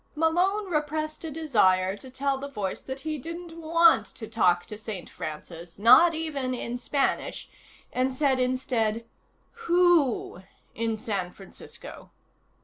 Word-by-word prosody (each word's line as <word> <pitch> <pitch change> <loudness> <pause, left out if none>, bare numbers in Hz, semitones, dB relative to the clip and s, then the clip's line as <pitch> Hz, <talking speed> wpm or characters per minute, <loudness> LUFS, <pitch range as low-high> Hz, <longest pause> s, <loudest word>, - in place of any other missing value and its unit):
Malone 355 +7 +2
repressed 310 -2 -2
a 325 - -4
desire 200 -12 +2
to 260 +5 -12
tell 270 +1 -1
the 280 - -5
voice 205 -8 -4
that 265 +1 -7
he 310 0 -3
didn't 335 +3 -8
want 330 - +4
to 220 +3 -9
talk 180 -6 +2
to 215 - -8
St. 210 -4 -7
Francis, 165 +2 -8
not 315 - +7
even 285 -5 -2
in 240 0 -4
Spanish, 275 +2 -1 0.5
and 255 +1 +1
said 265 0 +1
instead: 240 -3 0 0.6
"Who 340 - +3 0.3
in 225 -1 -2
San 200 -5 -3
Francisco?" 190 +1 -11
260 Hz, 135 wpm, -27 LUFS, 215-315 Hz, 0.6 s, not